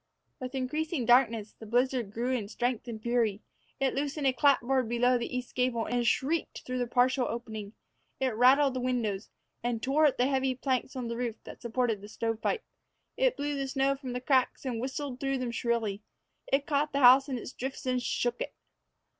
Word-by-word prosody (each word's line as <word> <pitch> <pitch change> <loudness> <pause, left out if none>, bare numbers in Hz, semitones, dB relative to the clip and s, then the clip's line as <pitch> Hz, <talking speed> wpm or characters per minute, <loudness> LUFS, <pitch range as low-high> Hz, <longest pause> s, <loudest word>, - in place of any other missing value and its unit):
With 255 +1 -6
increasing 290 +1 -1
darkness, 230 -4 +3
the 220 - -9
blizzard 245 -2 +1
grew 235 +4 -2
in 235 -6 -1
strength 245 +2 -2
and 225 -2 -5
fury. 225 -3 0 0.4
It 270 -1 +1
loosened 285 +1 -2
a 265 - +4
clapboard 260 -3 +3
below 245 +1 +3
the 240 +1 -3
east 250 -1 -6
gable, 250 -3 0
and 240 0 0
shrieked 295 +8 0
through 255 0 -3
the 245 - 0
partial 250 +1 +2
opening. 220 -3 -5 0.5
It 260 -4 0
rattled 265 +4 +5
the 255 - -2
window, 240 -6 0 0.4
and 240 -1 -1
tore 285 +6 +3
at 280 - 0
the 245 - +3
heavy 265 -1 +1
planks 260 0 -1
on 250 -2 -3
the 235 0 -4
roof 240 -3 -2
that - - -11
supported 235 -3 0
the 205 - -9
stovepipe. 225 - -2 0.5
It - - +2
blew 290 +1 -2
the 275 -1 -2
snow 270 +1 +1
from 265 -3 -6
the 250 - -3
cracks 260 0 +1
and 240 -3 -2
whistled 265 0 -4
through 270 -1 0
them 250 -2 -3
shrilly. 230 -4 -1 0.5
It 275 +1 +2
caught 295 -1 0
the 280 - +1
house 265 +3 +7
in 260 - -2
its 240 - -7
drifts 265 +1 -5
and 255 -1 +1
shook 240 0 -1
it. - - -4
250 Hz, 195 wpm, -30 LUFS, 235-270 Hz, 0.5 s, house